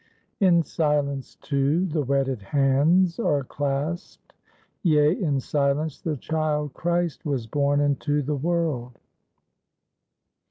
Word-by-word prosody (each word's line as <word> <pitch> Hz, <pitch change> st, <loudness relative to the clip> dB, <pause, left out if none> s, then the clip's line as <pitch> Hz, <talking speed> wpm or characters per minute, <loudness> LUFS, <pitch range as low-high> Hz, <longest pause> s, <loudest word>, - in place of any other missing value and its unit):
_ -, -, -35 dB, 0.4 s
In 170 Hz, -2 st, +4 dB
silence, 145 Hz, -4 st, -1 dB
too, 145 Hz, +5 st, +1 dB
the 160 Hz, -4 st, -1 dB
wedded 135 Hz, -3 st, 0 dB
hands 145 Hz, -, +2 dB
are 145 Hz, -11 st, +1 dB
clasped. 145 Hz, +6 st, -4 dB, 0.5 s
Yea, 150 Hz, -3 st, +4 dB
in 150 Hz, -9 st, 0 dB
silence 145 Hz, +2 st, -1 dB
the 160 Hz, -5 st, -2 dB
child 150 Hz, -1 st, -1 dB
Christ 175 Hz, -1 st, -1 dB
was 140 Hz, -7 st, -2 dB
born 145 Hz, +4 st, +1 dB
into 145 Hz, +1 st, 0 dB
the 150 Hz, +2 st, -1 dB
world. 145 Hz, -6 st, -2 dB
145 Hz, 115 wpm, -25 LUFS, 140-160 Hz, 0.5 s, In